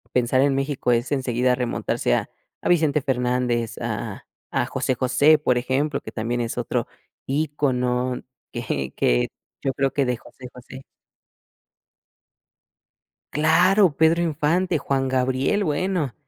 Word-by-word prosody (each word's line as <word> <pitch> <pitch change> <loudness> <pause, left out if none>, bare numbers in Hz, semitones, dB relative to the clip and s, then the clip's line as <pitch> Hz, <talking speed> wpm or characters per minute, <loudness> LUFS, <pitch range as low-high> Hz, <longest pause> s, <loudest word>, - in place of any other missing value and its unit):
Pensar 125 +2 +3
en 140 -1 +3
México 135 -2 0
es 120 +2 0
enseguida 125 -2 +1
remontarse 120 - -1
a - - -1 0.4
a - - +1
Vicente 155 -4 +3
Fernández, 125 -3 0
a - - -4 0.3
a - - +1
a - - -2
José 130 - -1
José, 140 +5 +4
por 125 -4 +1
ejemplo, 140 +4 0
que - - -9
también 120 +2 -2
es 115 - -4
otro - - -1 0.4
ícono 130 -4 0 0.3
que 70 - -3
que - - +2 0.3
yo 135 - 0
creo 135 0 0
que 140 - +1
de 125 -1 0
José 130 - -13
José. 130 +1 -11 2.5
Claro, 175 +3 +4
Pedro 160 +2 +4
Infante, 165 +3 +1
Juan 135 -2 -1
Gabriel. 130 +10 +1
Bueno, 160 -3 -1
130 Hz, 135 wpm, -23 LUFS, 125-150 Hz, 2.5 s, José